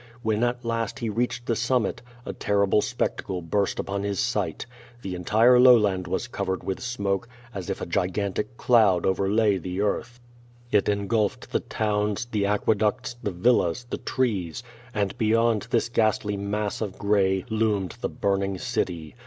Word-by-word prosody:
When 110 0 +1
at 120 0 -1
last 115 -1 -2
he 120 -4 -3
reached 120 +2 -2
the 115 - 0
summit, 125 -2 0 0.2
a - - -4
terrible 100 -1 +2
spectacle 95 -2 -2
burst 95 +4 -1
upon 100 0 -2
his 100 -1 -2
sight. - - -1 0.4
The 95 - -4
entire 110 +8 +4
lowland 105 -8 +5
was 95 +7 -2
cov 100 -5 -4
ered 95 0 -2
with 95 - -3
smoke, 105 -3 -2 0.3
as 95 -3 -6
if - - -3
a - - -2
gigantic 100 +6 -2
cloud 105 -8 +4
overlay 100 +2 +2
the 90 +3 -4
earth. 120 +4 -2 0.5
It 105 -1 +3
engulfed 105 +1 -1
the - - +1
towns, 105 +1 -1
the 105 -4 -1
aqueducts, 105 +3 0
the - - -1
villas, 110 +2 +1
the - - -3
trees. 105 -7 -1 0.3
And 100 -5 -1
beyond 115 -1 +2
this - - +1
ghastly 110 -3 +1
mass 100 +2 -3
of 100 -4 -4
gray, 95 -2 +1
loomed 105 -4 0
the - - -1
burning 100 -1 -1
city. 85 -3 -3
105 Hz, 160 wpm, -25 LUFS, 95-115 Hz, 0.5 s, lowland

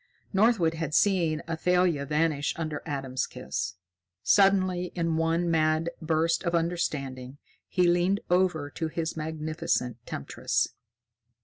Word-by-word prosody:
Northwood 195 -5 +3
had 160 -2 -3
seen 170 -6 +2
Athalia 170 -2 +1
vanish 150 -1 0
under 155 -3 -3
Adam's 135 -3 -2
kiss. 100 - -4 0.5
Suddenly, 185 +2 +4
in 165 -2 0
one 165 +1 +1
mad 160 +1 +2
burst 160 +1 +1
of 170 -1 0
understanding, 140 -6 -2 0.3
he 180 -2 +2
leaned 175 +3 +2
over 175 -5 +1
to 165 - -3
his 160 +1 -3
magnificent 155 -6 -2
temptress. 70 - -1
165 Hz, 115 wpm, -28 LUFS, 150-175 Hz, 0.5 s, Suddenly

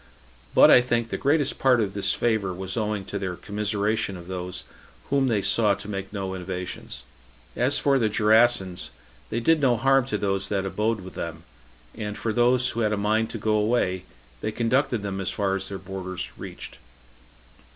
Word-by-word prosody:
But - - +8
I 125 - +8
think 120 -2 -1
the - - -1
greatest 145 0 +1
part 130 -2 +4
of 100 -3 -1
this 100 -1 +1
favor 110 -5 0
was 95 +1 -5
owing 105 -3 -2
to 100 - -4
their 95 -2 -3
commiseration 105 0 -1
of 85 0 -11
those 90 -1 -5 0.5
whom 140 -1 +3
they 105 -5 +1
saw 105 -3 +3
to 100 +1 -9
make 95 -2 -5
no 95 -2 -4
innovations. 90 0 -6 0.5
As 130 +4 +2
for 140 -1 +3
the 110 -3 +2
Gerasans, 110 -3 +3 0.4
they 115 - -1
did 160 +6 +3
no 125 -4 +3
harm 135 +1 +3
to - - -1
those 95 -1 -1
that 100 -1 -1
abode 105 +2 -1
with 95 0 -10
them; 80 -1 -6 0.5
and 105 -1 -5
for 110 - -2
those 125 +2 +3
who 120 - -4
had 105 -2 +1
a - - 0
mind 110 +2 +1
to - - -5
go 110 0 0
away, 105 -4 +1 0.3
they 110 - -2
conducted 120 0 +1
them 95 -1 -3
as 95 - -2
far 95 -1 0
as 95 - -4
their 100 - -5
borders 95 -1 -6
reached. - - -9
105 Hz, 190 wpm, -25 LUFS, 95-120 Hz, 0.5 s, But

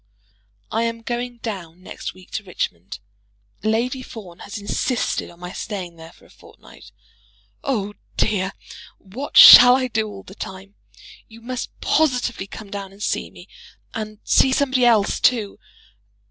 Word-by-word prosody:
I 225 - 0
am 230 0 -4
going 240 +1 -4
down 185 -5 -6
next - - -7
week 185 -1 -17
to 220 - -4
Richmond. 95 - -5 0.6
Lady 235 +5 0
Fawn 205 -9 -11
has 200 - -8
insisted 210 +4 -2
on 170 - -17
my 180 0 -7
staying 185 -5 -6
there 165 0 -12
for - - -22
a - - -21
fortnight. - - -17 0.7
Oh, 210 -7 -2 0.2
dear, 195 -2 0 0.4
what 240 +9 -6
shall 245 0 +11
I 260 -1 0
do 220 -2 -1
all 200 -2 -10
the 195 - -13
time? 195 0 -9 0.5
You 225 0 -15
must 250 +2 -6
positively 250 -9 0
come 205 0 -10
down 200 -1 -6
and 200 +2 -10
see - - -2
me, - - -15 0.5
and 215 -1 -6
see 265 - +4
somebody 260 -2 +2
else 220 -4 +3
too! 220 -5 +1
215 Hz, 150 wpm, -21 LUFS, 190-245 Hz, 0.7 s, shall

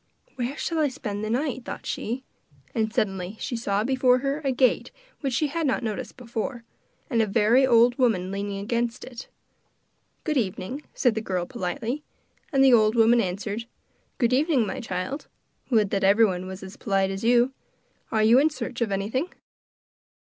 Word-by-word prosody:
'Where 255 +3 -3
shall 330 -1 -1
I 305 - +3
spend 215 -6 -5
the 215 - -2
night?' 260 +1 -1
thought - - -7
she. 245 +4 -3 0.5
And 220 -1 0
suddenly 195 -2 -2
she 250 - -3
saw 205 -3 0
before 255 0 +3
her 275 +3 -2
a 270 - +1
gate 255 0 +2 0.3
which 275 -3 -2
she 305 - +2
had 325 +1 -1
not 260 - 0
noticed 220 +2 -4
before, 240 0 -4 0.4
and 235 -5 +2
a 220 - +1
very 230 +6 +4
old 240 +1 +5
woman 195 -7 +2
leaning 200 0 -3
against 235 +4 -2
it. 245 -2 -9 1.0
'Good 305 -2 0
evening,' 225 +4 -2
said 245 -4 +3
the 220 - -2
girl 185 -4 -2
politely; 220 +12 -3 0.5
and 270 -2 +4
the 265 -2 +7
old 215 -1 +5
woman 230 +1 +5
answered: 205 +4 -3 0.5
'Good 240 -2 +2
evening, 275 -3 +3
my 260 +6 -4
child. 210 +5 -4 0.4
Would 215 -6 +3
that 195 0 0
everyone 195 -2 +3
was 190 +1 -7
as 190 0 -9
polite 195 -2 +1
as 195 +2 -5
you. 245 +2 +4 0.6
Are 220 -1 +2
you 230 +4 +6
in 300 +3 +4
search 255 -5 -6
of 225 -3 +1
anything? 220 - -1
230 Hz, 175 wpm, -25 LUFS, 205-260 Hz, 1.0 s, the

